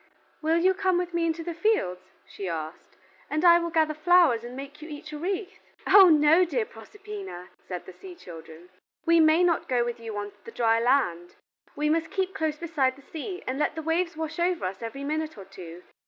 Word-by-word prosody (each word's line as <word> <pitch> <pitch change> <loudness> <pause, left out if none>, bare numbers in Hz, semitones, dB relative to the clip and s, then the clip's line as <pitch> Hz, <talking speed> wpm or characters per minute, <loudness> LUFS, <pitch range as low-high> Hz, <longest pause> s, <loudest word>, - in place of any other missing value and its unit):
"Will 320 +1 +2
you 370 +3 +3
come 375 -1 +1
with 355 0 -2
me 340 -1 +1
into 330 0 -2
the 340 +1 -4
fields," 330 - 0 0.2
she 195 - -7
asked, 160 -1 -7 0.3
"and 310 +3 0
I 340 0 +8
will 340 0 -3
gather 315 -1 +2
flowers 310 -6 +4
and 240 +1 -8
make 280 +3 -9
you 310 - -9
each 305 0 -9
a - - -4
wreath?" 375 +3 -4 0.3
"Oh 385 -1 +8
no, 310 +3 +5
dear 270 -10 -1
Proserpina," 385 - -10 0.2
said 180 -2 -6
the 185 - -11
sea 370 - -11
children, 165 - -12 0.4
"we 335 0 +5
may 315 +2 +5
not 345 -2 +1
go 245 -2 +2
with 240 0 -4
you 225 -2 -6
on 205 0 -4
the - - -10
dry 230 - +2
land. 230 -9 +1 0.4
We 300 +1 -1
must 320 +1 +1
keep 380 -1 -2
close 315 -5 -2
beside 300 -6 0
the 280 - -18
sea 360 +4 -6
and 260 +2 -3
let 300 - 0
the 320 - -5
waves 335 +1 -1
wash 320 0 -4
over 350 - 0
us 190 +4 -5
every 235 +5 -6
minute 310 -1 -3
or 195 - -10
two. 180 -2 -11
310 Hz, 215 wpm, -26 LUFS, 230-345 Hz, 0.4 s, I